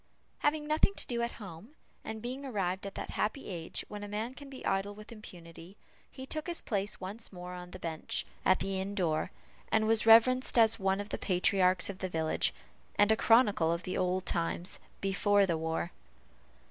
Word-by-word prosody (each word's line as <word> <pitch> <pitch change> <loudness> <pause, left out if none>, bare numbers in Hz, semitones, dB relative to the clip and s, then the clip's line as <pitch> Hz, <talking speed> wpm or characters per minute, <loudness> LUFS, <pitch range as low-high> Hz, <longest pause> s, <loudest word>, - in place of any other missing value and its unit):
Having 295 0 +1
nothing 310 +6 +3
to - - -2
do 235 -1 -2
at 235 0 -1
home, 205 - -10 0.3
and 220 0 -6
being 255 +3 -4
arrived 195 -6 -2
at 195 - -8
that - - -5
happy 245 +6 -2
age 170 -3 -5
when 205 0 -7
a - - -5
man 215 +4 -3
can 280 +1 -11
be 265 -1 -9
idle 195 +1 0
with 215 +2 -12
impunity, 175 -4 -12 0.3
he 260 - -8
took 310 +4 -3
his 345 -1 -2
place 205 -1 -2
once 200 +5 -6
more 180 -1 -8
on 180 0 -8
the 185 - -9
bench, 165 -3 -3 0.2
at 185 - +5
the 195 -1 -2
inn 200 +1 -4
door, 165 -6 0 0.4
and 220 0 +3
was 225 0 +3
reverenced 255 +3 +6
as 225 -1 +5
one 195 0 +1
of 205 +1 -5
the - - -3
patriarchs 185 0 +3
of 195 -2 -6
the 185 - -2
village, 160 -2 +1 0.4
and 205 +1 +5
a - - +6
chronicle 220 -8 +4
of 170 +1 -2
the 185 - -3
old 185 0 0
times 170 +1 0 0.2
"before 200 +1 +3
the 170 -3 0
war." 160 +2 -2
200 Hz, 200 wpm, -31 LUFS, 180-225 Hz, 0.4 s, reverenced